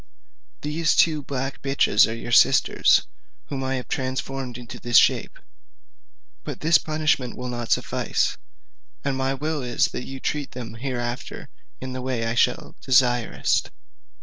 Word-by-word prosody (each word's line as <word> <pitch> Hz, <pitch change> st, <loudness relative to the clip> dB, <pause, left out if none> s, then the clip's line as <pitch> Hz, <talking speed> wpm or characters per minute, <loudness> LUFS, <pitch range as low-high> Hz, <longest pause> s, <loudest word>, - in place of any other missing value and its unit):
"These 155 Hz, +2 st, +1 dB
two 155 Hz, -3 st, +3 dB
black 135 Hz, -1 st, -4 dB
bitches 135 Hz, -6 st, +3 dB
are 110 Hz, -, -3 dB
your 120 Hz, +1 st, -7 dB
sisters, -, -, +4 dB, 0.4 s
whom 135 Hz, -2 st, -3 dB
I 130 Hz, 0 st, -1 dB
have 125 Hz, -, -5 dB
transformed 130 Hz, -1 st, -3 dB
into 120 Hz, -2 st, -9 dB
this 120 Hz, 0 st, +3 dB
shape. -, -, +3 dB, 1.1 s
But -, -, -7 dB
this 160 Hz, +1 st, +5 dB
punishment 155 Hz, -5 st, -1 dB
will 125 Hz, 0 st, -5 dB
not 120 Hz, -1 st, -5 dB
suffice; -, -, 0 dB, 0.7 s
and 140 Hz, -1 st, -1 dB
my 135 Hz, 0 st, -1 dB
will 150 Hz, +2 st, -2 dB
is 125 Hz, -1 st, +1 dB
that 125 Hz, -, -5 dB
you 135 Hz, 0 st, -7 dB
treat 145 Hz, 0 st, -3 dB
them 120 Hz, -3 st, -7 dB
hereafter 120 Hz, 0 st, -5 dB, 0.3 s
in 130 Hz, 0 st, -6 dB
the 130 Hz, -, -5 dB
way 125 Hz, -3 st, -2 dB
I 115 Hz, -, -1 dB
shall 120 Hz, -, 0 dB
direst." 125 Hz, -3 st, +2 dB
130 Hz, 150 wpm, -24 LUFS, 120-140 Hz, 1.1 s, this